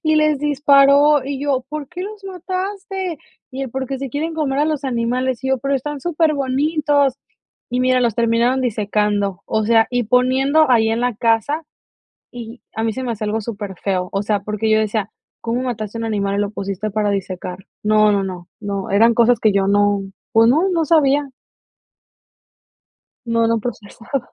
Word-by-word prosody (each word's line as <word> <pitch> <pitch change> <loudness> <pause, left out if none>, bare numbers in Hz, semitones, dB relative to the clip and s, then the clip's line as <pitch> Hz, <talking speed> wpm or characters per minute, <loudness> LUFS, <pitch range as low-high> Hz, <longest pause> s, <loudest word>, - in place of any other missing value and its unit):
y 310 -1 +2
les 305 -2 +3
disparó 285 0 +4
y 275 -1 -4
yo: 275 -3 0
"¿Por 300 -3 -5
qué 360 0 -6
los 415 0 -8
mataste?", 380 0 -4 0.3
y 270 +1 -5
él: 260 - -5
"Porque 265 +1 -4
se 270 -2 -5
quieren 320 +3 -3
comer 285 -3 -1
a 295 - +3
los 300 -3 -2
animales", 250 0 -1
y - - -1
yo: 265 -1 +1
"Pero 275 +2 -1
están 290 +2 -3
superbonitos". 295 -2 +1 0.6
Y 250 +1 0
mira, 255 0 +3
los 235 -4 +1
terminaron 235 +3 +2
disecando. 205 -3 -1
O 220 -1 0
sea, 225 0 +4
y 245 -2 0
poniendo 260 +5 +3
ahí 225 -2 +4
en 225 - 0
la 245 -2 0
casa 230 +8 +1 0.7
y 235 -1 -9
a 220 - -2
mí 225 - 0
se 260 +2 -5
me 240 - -2
hace 215 -1 -5
algo 215 +1 -1
superfeo. 195 -4 -3
O 195 +1 -1
sea, 205 -1 0
porque 215 +2 -2
yo 215 - +4
decía: 215 -1 -1 0.3
"¿Cómo 235 +2 -2
mataste 230 -3 -4
a - - -4
un 230 - -3
animal 200 -2 -1
y - - -1
lo 205 -1 0
pusiste 200 0 -4
para 210 0 0
disecar?". 185 -2 -4 0.2
No, 215 0 +4
no, 200 -1 +1
no, 180 -1 -7
no, 200 -2 -4
eran 225 +4 +4
cosas 235 0 +3
que 215 -2 +3
yo 195 -1 +1
no, 205 0 +2 0.3
pues 225 +1 +5
no, 320 +9 +3
no 335 -3 +1
sabía. 290 -3 +3 2.0
No, 230 0 +2
no 230 0 +1
procesaba. 235 +3 -6
245 Hz, 185 wpm, -19 LUFS, 215-285 Hz, 2.0 s, pues